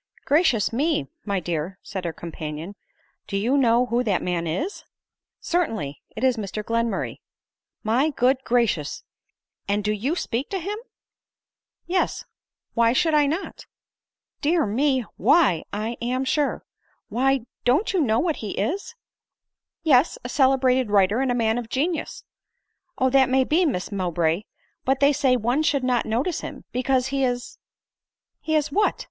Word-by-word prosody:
" - - -29
Gracious 280 - +3
me! 285 - +1 0.2
my 200 -2 0
dear," 175 +1 -3
said 190 -3 -5
her 170 - -1
companion, 160 +2 -7 0.3
" - - -41
do 195 - -2
you 235 +7 +1
know 245 -2 +4
who 240 +1 0
that 205 -6 0
man 175 -2 -1
is 305 - -3 0.2
?" - - -67
" - - -67
Certainly; 225 - -2
it 220 - -5
is 255 -2 +3
Mr 210 0 -4
GlenmulTay.,, 230 -2 -1 0.4
" - - -62
My 270 +6 +3
good 260 -1 +1
gracious! 230 -11 0 0.6
and 205 +1 0
do 210 - +1
you 240 +10 -1
speak 255 -5 -2
to 390 - -2
him 390 +4 -3 0.4
?" - - -69
" - - -64
Yes; 360 +2 -1 0.5
why 230 0 +3
should 325 +3 +2
I 295 -1 +4
not 325 +7 -4 0.2
?" - - -69
" - - -57
Dear 320 +1 +2
me! 260 +3 +1
Why, 225 - +4
I 220 +3 -3
am 255 +2 -1
sure! 290 +1 0 0.5
Why— 265 0 +1 0.2
don't 275 - +2
you 370 - +2
know 225 -6 +2
what 325 -3 0
he 210 -3 -5
is 390 - -2 0.3
?" - - -65
" - - -66
Yes; 305 - +4
a - - -5
celebrated 260 -3 +3
writer, 205 +2 +3
and 265 -1 +1
a - - +1
man 225 0 +1
of 230 -2 -7
genius." 315 +7 -2 0.4
" 360 -2 -52
Oh, 260 0 +2
that 265 -1 +5
may 260 0 +4
be, 330 +6 +2
Miss 200 -8 -2
Mowbray; 175 -1 0 0.4
but 265 +1 +1
they 285 +1 +5
say 265 -3 +3
one 245 +6 +1
should 285 -4 +1
not 250 -2 +1
notice 255 +10 -1
him, - - -8
because 255 0 +1
he 275 0 0
is 245 -1 -2 0.3
" - - -68
" - - -63
He 315 - -1
is 300 -1 +1
what 415 +7 +1
250 Hz, 185 wpm, -24 LUFS, 210-285 Hz, 0.6 s, that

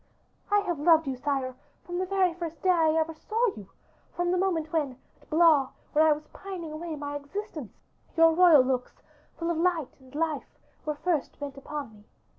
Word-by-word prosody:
"I 410 -1 +4
have 350 -6 -2
loved 325 +1 +5
you, 270 -2 -2
sire, 265 -1 -2 0.3
from 350 0 -3
the 370 - -1
very 375 -2 +2
first 335 -2 -7
day 375 - +5
I 320 -3 +3
ever 325 0 -1
saw 445 +9 -1
you; 200 -3 -11 0.5
from 350 0 0
the 365 - +2
moment 335 -4 0
when 285 -6 0 0.2
at - - -24
Blois, 310 -4 +5 0.2
where 310 - +5
I - - +6
was 300 0 -1
pining 370 -5 -7
away 320 +1 -5
my 290 0 -5
existence, 295 - -6 0.4
your 330 0 +7
royal 335 -5 +7
looks, 255 -1 -3 0.3
full 335 0 -1
of 335 - -1
light 330 -5 0
and 260 +1 -17
life, 310 -3 -2 0.3
were 300 - 0
first 320 -1 -1
bent 285 -2 -5
upon 275 -3 -6
me. 210 0 -18
320 Hz, 195 wpm, -28 LUFS, 285-350 Hz, 0.5 s, your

